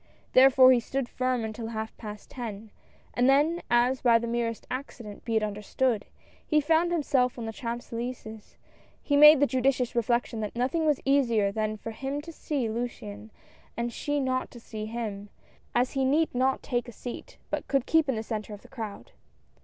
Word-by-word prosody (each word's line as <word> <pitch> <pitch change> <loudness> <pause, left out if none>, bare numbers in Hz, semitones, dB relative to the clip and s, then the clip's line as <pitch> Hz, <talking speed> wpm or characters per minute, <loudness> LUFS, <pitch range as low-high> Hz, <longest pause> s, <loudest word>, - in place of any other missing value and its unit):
Therefore 260 0 +8
he 250 - +5
stood 265 +2 -3
firm 255 -2 -1
until 220 +1 -5
half 220 -1 -5
past 210 -2 -9
ten, 220 -4 -7 0.4
and 245 +2 +3
then, 300 +5 +3
as 245 +2 +3
by 235 -2 +5
the 235 - -3
merest 230 -1 -2
accident, 240 -5 -7
be 230 - -2
it 220 - +2
understood, 210 +2 -1 0.4
he 305 - +2
found 325 +3 +2
himself 270 -7 +1
on 235 - -5
the 225 - -5
Champs 235 +2 -5
Elys^es, 230 -2 -6 0.5
he 285 - +1
made 300 0 +9
the 285 - +5
judicious 260 -2 +1
reflection 235 0 0
that 210 0 -4
nothing 270 +7 0
was 295 -3 +2
easier 235 -7 +3
than 215 +1 -2
for 225 - -7
him 270 +5 -4
to 330 +3 -9
see 290 -6 -2
Luciane 215 - -5 0.5
and 235 0 -2
she 290 +3 -1
not 260 -1 -1
to 240 - -12
see 215 -2 -7
him, 215 -3 -5 0.5
as 245 +1 +2
he 270 -1 0
need 300 +5 +2
not 260 +2 +1
take 245 -1 -2
a - - -7
seat, 245 - -8
but - - -2
could 275 -3 +1
keep 320 -3 +3
in 265 - +1
the 220 - -3
centre 215 -2 -5
of 205 - -17
the - - -14
crowd. 220 -5 -7
240 Hz, 190 wpm, -28 LUFS, 220-270 Hz, 0.5 s, made